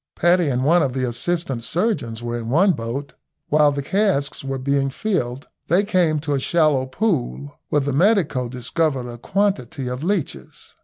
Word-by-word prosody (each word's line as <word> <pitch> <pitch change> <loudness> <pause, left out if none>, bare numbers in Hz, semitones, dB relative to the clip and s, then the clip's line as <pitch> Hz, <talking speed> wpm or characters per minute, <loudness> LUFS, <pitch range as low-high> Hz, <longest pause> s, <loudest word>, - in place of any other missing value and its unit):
Paddy 175 -1 +3
and 130 -2 0
one 170 +4 +5
of 135 -4 0
the 130 -1 -1
assistant 135 +1 -2
surgeons 140 - -2
were 120 0 -3
in 115 -1 -4
one 185 +9 +4
boat. 135 0 -4 0.4
While 150 -1 +4
the 140 0 -3
casks 190 -7 0
were 135 0 -3
being 135 +1 0
filled, 140 - -2 0.2
they 180 +4 +3
came 180 -6 +2
to 145 -1 -2
a 140 - +1
shallow 150 -3 +2
pool, 145 - -2
where 145 - +2
the 140 0 -2
medico 155 - +2
discovered 130 +2 -1
a 120 -1 -8
quantity 150 - -1
of 125 +1 -4
leeches. 160 - -3
140 Hz, 170 wpm, -21 LUFS, 125-175 Hz, 0.4 s, one